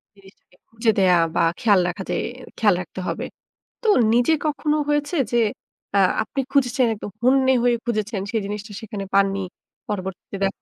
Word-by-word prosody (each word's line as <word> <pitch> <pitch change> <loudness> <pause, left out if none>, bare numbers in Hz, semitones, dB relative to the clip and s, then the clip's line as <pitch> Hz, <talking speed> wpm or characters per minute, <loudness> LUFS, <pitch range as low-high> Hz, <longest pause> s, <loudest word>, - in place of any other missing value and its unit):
জিনিসটাকে 195 -2 -21
খুঁজে 225 0 +1
দেয়া 180 -2 +5 0.2
বা - - +3 0.2
খেয়াল 210 -6 +4
রাখা 185 +2 -4
যে - - 0 0.4
খেয়াল 210 -5 +4
রাখতে 180 +2 -9
হবে। - - -3 0.6
তো 450 - -1 0.3
নিজে 245 +6 +4
কখনো 300 0 0
হয়েছে 295 +3 0 0.2
যে, 240 - +2 0.6
আ - - +5 0.2
আপনি 275 - -6
খুঁজেছেন, 255 -2 +2
একদম 205 -1 -8
হন্যে 265 +1 +4
হয়ে 245 -1 +4
খুঁজেছেন 215 -3 -2
সেই 225 - 0
জিনিসটা 210 +1 -6
সেখানে 210 -3 -6
পাননি? 195 0 +3 0.5
পরবর্তীতে 190 0 -5
দেখ 195 - +1
215 Hz, 160 wpm, -22 LUFS, 195-255 Hz, 0.6 s, দেয়া